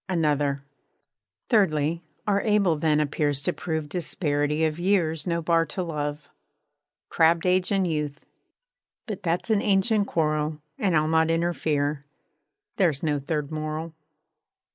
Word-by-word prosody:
_ - - -68
ANOTHER 145 -3 +1 0.8
Thirdly, 165 -7 +2 0.2
our 200 -1 +2
able 205 -6 +2
then 150 0 +2
appears 145 -1 0
to 175 - +2
prove 160 -3 -3
Disparity 150 -2 -1
of 155 +1 -2
years 175 -4 +1
no 170 -1 -1
bar 165 0 +3
to 185 - -3
love. 150 -3 -4 0.8
Crabb'd 165 +1 +3
Age 180 +1 +2
and 195 -2 +2
Youth 150 -3 -3 0.8
But 210 -4 -5
that's 175 +5 -1
an 210 -2 +3
ancient 205 +1 +2
quarrel, 155 -1 0 0.2
_And 190 -5 +1
I'll 155 0 +3
not 160 0 +3
interfere. 155 -4 0 0.7
There 185 -5 +4
's 140 +1 -6
no 150 -2 +1
third 150 +1 -3
moral. 155 +1 -4
160 Hz, 140 wpm, -25 LUFS, 150-180 Hz, 0.8 s, There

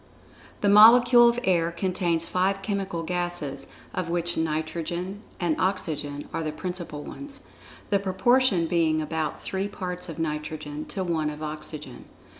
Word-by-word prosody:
The 205 - +2
molecule 240 +3 +8
of 235 +1 0
air 170 -6 +2
contains 170 -2 0
five 195 +2 0
chemical 195 -4 -2
gases, 175 -6 -3 0.3
of 180 -2 -2
which 175 0 -1
nitrogen 165 +4 -3 0.2
and 170 -4 +1
oxygen 150 -6 -2
are 165 - -1
the 155 -1 -2
principal 175 -2 -5
ones, 280 -1 -8 0.5
the 200 - +4
proportion 195 0 +3
being 160 -2 +2
about 155 0 -3
three 190 +1 -2
parts 180 -3 -5
of 165 - -7
nitrogen 150 -1 -4
to 190 - -4
one 160 -4 0
of 150 +1 -7
oxygen. 150 -3 -7
175 Hz, 140 wpm, -26 LUFS, 155-190 Hz, 0.5 s, molecule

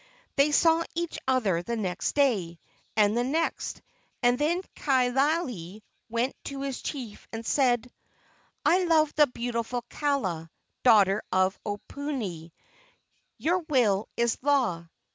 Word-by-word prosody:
They 285 +1 +4
saw 325 +2 +4
each 340 0 -3
other 220 -10 +2
the 235 +7 -3
next 185 -5 -2
day, 200 - +1 0.4
and 210 0 +4
the 240 - +2
next, 315 +6 -2 0.4
and 245 0 +3
then 340 +5 +1
Kaaialii 255 - 0 0.3
went 235 +3 -1
to 275 -1 -5
his 275 -2 -4
chief 245 -8 -6
and 225 0 -6
said: 250 -3 +2 0.8
"I 365 +1 +4
love 315 -3 +3
the 295 -1 +5
beautiful 240 -1 -3
Kaala, 190 - -1 0.3
daughter 210 -4 +5
of 185 +1 +2
Oponui. 205 - -5 0.9
Your 350 +4 +1
will 245 - +1
is 235 -1 +1
law. 250 -12 +1
245 Hz, 125 wpm, -27 LUFS, 205-285 Hz, 0.9 s, the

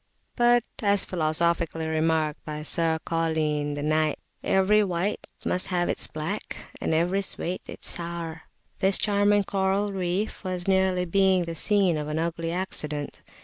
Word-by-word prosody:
But 240 0 +4 0.2
as 200 -2 +2
philosophically 165 -1 0
remarked 160 -1 0
by 150 -1 -5
Sir 165 +1 +1
Cauline 155 -3 0
the 145 - -4
Knyghte 155 0 +2 0.3
"Every 205 +2 +4
whyte 185 +1 -2 0.2
must 180 - 0
have 175 -1 0
its - - 0
blacke, 160 +7 -4 0.2
And - - -1
every 175 +5 +2
sweete 185 -2 -4
its - - -4
soure 170 -1 -5 0.2
" - - -35
this 195 0 +4
charming 205 0 +3
coral 195 +1 0
reef 190 +4 -2
was 185 -1 -3
nearly 190 -1 +2
being 190 0 +3
the 165 - -4
scene 190 0 +2
of 150 - -4
an 150 +1 -2
ugly 165 0 -2
accident. 150 -5 -4
170 Hz, 150 wpm, -26 LUFS, 160-195 Hz, 0.3 s, But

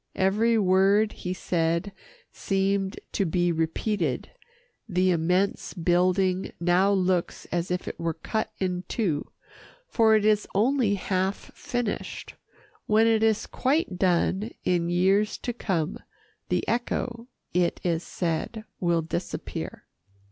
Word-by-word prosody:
Every 215 +5 +3
word 200 +2 +4
he 180 - -5
said 170 +1 0 0.4
seemed 195 0 -1
to - - 0
be 175 0 +1
repeated. 165 - -1 0.6
The 185 0 +2
immense 180 +5 0
building 185 +2 +2
now 180 +3 +3
looks 185 -3 0
as 175 0 -1
if 180 0 -2
it - - -6
were 165 -1 -1
cut 220 -1 -2
in 180 -1 -2
two, 170 -11 -1 0.6
for 225 - +4
it 215 -1 +2
is 215 -1 +3
only 230 0 +3
half 190 0 -2
finished. 245 -4 -4 0.5
When 215 +1 +4
it 225 -1 +3
is 220 -1 +2
quite 265 - 0
done 190 +3 +2
in 175 -1 +1
years 190 +4 +2
to 245 - -4
come, 180 -7 -2 0.5
the - - 0
echo, 235 0 -2 0.3
it 175 -1 +1
is 170 -2 0
said, 175 +6 -3 0.2
will 170 -2 +1
disappear. 170 +2 -5
190 Hz, 125 wpm, -26 LUFS, 175-215 Hz, 0.6 s, word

